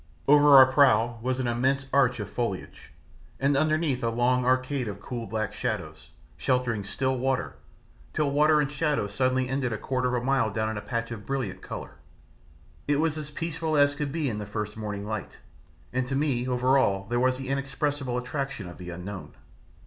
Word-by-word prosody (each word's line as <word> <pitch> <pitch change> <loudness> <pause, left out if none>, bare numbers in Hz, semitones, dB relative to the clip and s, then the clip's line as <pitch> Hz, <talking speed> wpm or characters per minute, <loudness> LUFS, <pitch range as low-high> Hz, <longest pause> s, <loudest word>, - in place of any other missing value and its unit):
Over 145 0 +7
our 135 -1 +11
prow 120 -4 +4
was 130 +2 -1
an 130 - -1
immense 130 +3 +1
arch 130 -3 +3
of 105 - -4
foliage, 115 -6 -4 0.5
and 140 +1 +2
underneath 155 -3 +1
a 115 - +2
long 125 +2 +2
arcade 130 0 +1
of 100 -1 -5
cool 120 0 -6
black 110 -1 -2
shadows, - - -4 0.3
sheltering 125 -5 0
still 130 +6 -1
water, 130 0 -1 0.6
till 150 -2 0
water 150 +2 +4
and 145 -1 0
shadow 150 -5 0
suddenly 130 +5 0
ended 130 -1 -1
a 110 - -2
quarter 125 +2 -1
of - - +1
a - - -5
mile 135 -4 +2
down 110 +1 -1
in 110 - -4
a - - -4
patch 115 +1 -3
of 105 -3 -7
brilliant 115 -9 -3
colour. - - -8 0.9
It 145 - +3
was 160 -1 +1
as 150 -2 -5
peaceful 160 0 -2
as 145 0 +5
could 145 -1 -3
be 155 -1 -1
in 105 -4 -2
the 105 - -6
first 105 0 -4
morning 105 -2 -5
light, 110 0 -5 0.6
and 130 0 0
to 135 - -2
me 135 -4 0
over 130 +2 +3
all 100 -6 +1
there 120 +1 0
was 130 0 +2
the 135 0 -6
inexpressible 140 -1 -1
attraction 135 -4 -4
of 90 - -11
the 90 -1 -7
unknown. 90 +3 -7
130 Hz, 195 wpm, -27 LUFS, 115-140 Hz, 0.9 s, our